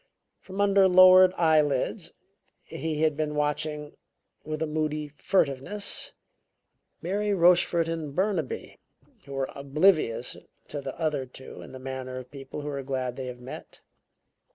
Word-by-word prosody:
From 190 Hz, +1 st, -9 dB
under 200 Hz, -1 st, +5 dB
lowered 185 Hz, 0 st, +8 dB
eyelids 155 Hz, -5 st, +1 dB, 0.5 s
he 155 Hz, -1 st, -3 dB
had 155 Hz, -2 st, +2 dB
been 150 Hz, 0 st, -2 dB
watching, 150 Hz, 0 st, -2 dB, 0.5 s
with 155 Hz, +1 st, -3 dB
a -, -, +1 dB
moody 150 Hz, -1 st, -2 dB
furtiveness, 185 Hz, +4 st, 0 dB, 0.9 s
Mary 205 Hz, +3 st, 0 dB
Rochefort 175 Hz, -1 st, +4 dB
and 160 Hz, -4 st, -4 dB
Burnaby, 185 Hz, -7 st, -2 dB, 0.5 s
who 140 Hz, -, -9 dB
were 135 Hz, -1 st, -2 dB
oblivious 140 Hz, -3 st, +1 dB, 0.3 s
to 145 Hz, -, -4 dB
the 135 Hz, -1 st, -7 dB
other 150 Hz, -5 st, -1 dB
two 130 Hz, +1 st, -11 dB
in -, -, -11 dB
the 130 Hz, -, -8 dB
manner 130 Hz, -1 st, -6 dB
of 125 Hz, -1 st, -9 dB
people 135 Hz, +1 st, -8 dB
who 145 Hz, -, -5 dB
are 140 Hz, -1 st, -3 dB
glad 130 Hz, -2 st, -3 dB
they 130 Hz, -1 st, -5 dB
have 125 Hz, -1 st, -8 dB
met. 125 Hz, -, -10 dB
150 Hz, 140 wpm, -27 LUFS, 135-170 Hz, 0.9 s, lowered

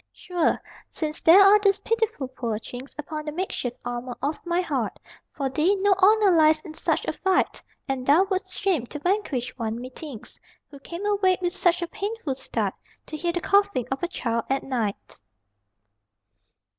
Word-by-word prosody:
Sure, 350 Hz, -3 st, 0 dB, 0.3 s
since 310 Hz, -3 st, -2 dB
there 335 Hz, +4 st, +8 dB
are 405 Hz, +2 st, +7 dB
these 400 Hz, -1 st, +3 dB
pitiful 445 Hz, -, -1 dB
poor 235 Hz, -4 st, -3 dB
chinks 245 Hz, +4 st, -9 dB
Upon 305 Hz, +1 st, -5 dB
the 300 Hz, -, -3 dB
makeshift 300 Hz, -8 st, -3 dB
armor 245 Hz, 0 st, -4 dB
of 295 Hz, +3 st, -3 dB
my 345 Hz, +1 st, +1 dB
heart, 360 Hz, -, -2 dB, 0.3 s
For 275 Hz, -2 st, -2 dB
thee 310 Hz, +9 st, +2 dB
no 400 Hz, 0 st, +3 dB
honor 415 Hz, +1 st, +5 dB
lies 310 Hz, -1 st, +5 dB
in 310 Hz, -, -10 dB
such -, -, 0 dB
a -, -, -1 dB
fight! 380 Hz, -1 st, 0 dB, 0.3 s
And 270 Hz, -2 st, -2 dB
thou 290 Hz, +8 st, +5 dB
wouldst 380 Hz, -1 st, -3 dB
shame 355 Hz, -, 0 dB
to 295 Hz, -, -6 dB
vanquish 295 Hz, -, -1 dB
one, 225 Hz, 0 st, -2 dB
me 255 Hz, +1 st, -8 dB
thinks, 270 Hz, -5 st, -9 dB, 0.3 s
Who 280 Hz, -, -11 dB
came 340 Hz, +7 st, -7 dB
awake 390 Hz, -3 st, +2 dB
with 350 Hz, -1 st, 0 dB
such 355 Hz, -2 st, +2 dB
a -, -, -2 dB
painful 405 Hz, -4 st, -4 dB
start 265 Hz, 0 st, -2 dB, 0.3 s
To 310 Hz, -, -7 dB
hear 340 Hz, +3 st, -1 dB
the 350 Hz, 0 st, -3 dB
coughing 400 Hz, -, +2 dB
of 265 Hz, -, -2 dB
a 350 Hz, -, 0 dB
child 230 Hz, -9 st, -2 dB
at 270 Hz, 0 st, 0 dB
night. 225 Hz, -, -4 dB
320 Hz, 180 wpm, -25 LUFS, 265-380 Hz, 0.3 s, there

